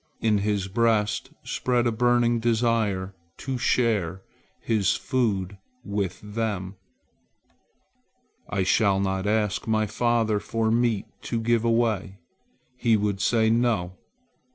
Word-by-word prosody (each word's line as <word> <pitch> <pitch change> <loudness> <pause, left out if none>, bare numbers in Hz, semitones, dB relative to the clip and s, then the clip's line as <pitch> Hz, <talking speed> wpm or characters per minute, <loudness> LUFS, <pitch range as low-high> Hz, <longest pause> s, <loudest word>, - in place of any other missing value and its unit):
In 110 -2 +2
his 100 -1 -1
breast 110 0 +1
spread 125 -1 0
a 120 - +2
burning 120 0 +2
desire 115 -5 0 0.2
to 130 -1 -4
share 100 -8 0 0.4
his 105 -5 +1
food 100 -7 -1 0.2
with 100 -4 -3
them. 105 -3 -3 1.8
"I 100 -2 0
shall 95 +1 +3
not 95 0 -1
ask 105 -2 0
my 110 -1 +2
father 110 0 +1
for 110 +1 -1
meat 115 -3 +1 0.2
to 115 - -2
give 115 0 +1
away. 115 -4 0 0.6
He 115 -3 +2
would 100 -1 -1
say 110 0 +3
'No!' 115 -7 +1
110 Hz, 115 wpm, -25 LUFS, 100-115 Hz, 1.8 s, shall